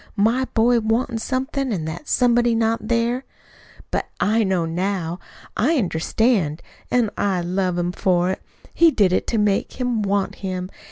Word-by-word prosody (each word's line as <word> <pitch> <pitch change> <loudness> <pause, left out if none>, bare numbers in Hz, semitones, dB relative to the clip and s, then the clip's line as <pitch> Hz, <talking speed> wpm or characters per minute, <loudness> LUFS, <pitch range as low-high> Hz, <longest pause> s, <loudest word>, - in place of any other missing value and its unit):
My 230 +6 +2
boy 235 +1 +4
wantin' 225 +1 0
somebody, 265 +2 -2
an' 160 -4 -4
that 160 - -6
somebody 240 -1 +3
not 225 -1 0
there! 235 +2 0 0.7
"But - - -1
I 220 +2 +2
know 190 -4 +1
now. 175 0 -2 0.4
I 300 +8 +2
understand. 185 - 0 0.3
An' 240 -4 +2
I 195 -3 +1
love 180 +1 -1
him 175 0 0
for 180 -1 +1
it. - - -5 0.3
He 335 - +6
did 200 - +2
it - - 0
to 230 - 0
make 210 -2 +1
him 245 -3 -1
want 200 -1 -1
him. 185 -1 -4
210 Hz, 160 wpm, -22 LUFS, 185-240 Hz, 0.7 s, He